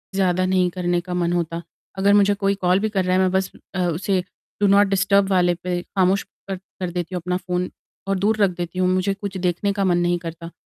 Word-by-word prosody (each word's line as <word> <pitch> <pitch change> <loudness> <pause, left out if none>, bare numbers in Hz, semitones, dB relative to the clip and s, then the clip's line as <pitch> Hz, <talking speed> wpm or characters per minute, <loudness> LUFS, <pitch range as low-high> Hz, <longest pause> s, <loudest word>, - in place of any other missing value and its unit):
ज़्यादा 185 -1 +2
नहीं 185 -1 +2
करने 175 -1 0
का 180 0 -6
मन 175 -1 0
होता, 170 -1 -2 0.4
अगर 200 +1 +4
मुझे 205 0 +5
कोई 200 0 0
कॉल 180 +1 +4
भी 215 +1 0
कर 195 -3 0
रहा 185 - +1
है, - - +3
मैं 185 -1 +2
बस 190 0 0 0.2
अ, - - -1
उसे 180 +2 0 0.4
डू 205 - +5
नॉट 200 +1 +5
डिस्टर्ब 195 0 +2
वाले 180 -2 +3
पे 175 0 -3
ख़ामोश 190 0 +1 0.2
कर 195 - -2
कर 185 -1 -7
देती 175 +1 -4
हूँ 180 - -3
अपना 180 +1 -1
फ़ोन 180 0 -3 0.4
और 195 -1 +1
दूर 215 +3 +2
रख 200 - +5
देती 175 +1 -4
हूँ। 185 - +3
मुझे 185 +2 +1
कुछ 200 -1 -6
देखने 180 +2 0
का 200 0 -1
मन 175 -2 +3
नहीं 175 0 +1
करता 165 0 -8
185 Hz, 235 wpm, -22 LUFS, 175-195 Hz, 0.4 s, मुझे